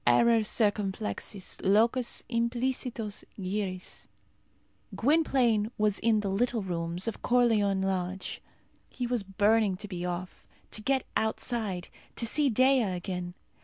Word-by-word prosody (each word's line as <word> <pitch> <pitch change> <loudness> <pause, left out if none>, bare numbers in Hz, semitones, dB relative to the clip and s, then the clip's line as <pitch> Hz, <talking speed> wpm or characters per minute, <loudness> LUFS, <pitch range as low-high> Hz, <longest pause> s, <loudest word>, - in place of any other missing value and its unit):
Error 230 - +5
circumflexus, 205 -2 -1
locus 230 +5 +2
implicitus 235 -2 -2 0.2
gyris. 185 -1 -4 0.9
Gwynplaine 250 -6 +2
was 210 -2 +1
in 220 -2 +3
the 200 - -2
"little 230 +2 0
rooms" 175 +1 -1
of 230 - -3
Corleone 220 -6 +3
Lodge. 190 0 -2 0.5
He 250 - -4
was 240 -2 0
burning 205 0 +2
to 205 - -7
be 180 -3 -5
off, 180 +1 -5 0.2
to 215 - -5
get 265 +2 +1
outside, 220 -4 -1 0.3
to 235 - -2
see 285 +4 +2
Dea 260 +3 +4
again. 180 -3 -3
210 Hz, 120 wpm, -29 LUFS, 190-235 Hz, 0.9 s, Error